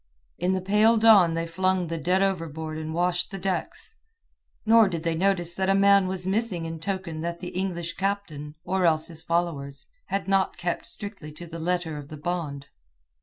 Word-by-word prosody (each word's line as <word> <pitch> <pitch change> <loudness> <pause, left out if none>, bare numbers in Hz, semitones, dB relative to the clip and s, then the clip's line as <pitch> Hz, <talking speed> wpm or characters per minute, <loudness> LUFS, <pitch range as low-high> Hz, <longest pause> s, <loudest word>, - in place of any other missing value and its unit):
In 180 +2 +1
the 190 - -1
pale 210 +4 +4
dawn 205 -7 +6
they 165 0 -1
flung 185 +2 0
the 165 0 -4
dead 180 +6 +2
overboard 160 -4 -2
and 160 0 -5
washed 175 +1 0
the 195 - -6
decks, 195 - -3 0.7
nor 225 -2 +6
did 165 -3 -4
they 165 -1 0
notice 175 0 0
that 190 +1 -1
a 195 - +4
man 200 -1 +5
was 185 -1 -3
missing 195 -3 -1
in 165 0 -5
token 180 -3 -4
that 170 +1 -3
the 180 - -5
English 175 -2 -3
captain, 175 -7 -3
or 190 +1 0
else 155 -1 +2
his 165 -2 -5
followers, 155 -5 -2 0.2
had 195 -1 -2
not 195 -1 +1
kept 175 -1 -3
strictly 200 -7 -6
to 170 +3 -9
the 165 0 -8
letter 170 -2 -1
of 145 - -10
the 155 - -9
bond. 150 -3 -3
175 Hz, 190 wpm, -26 LUFS, 165-195 Hz, 0.7 s, dawn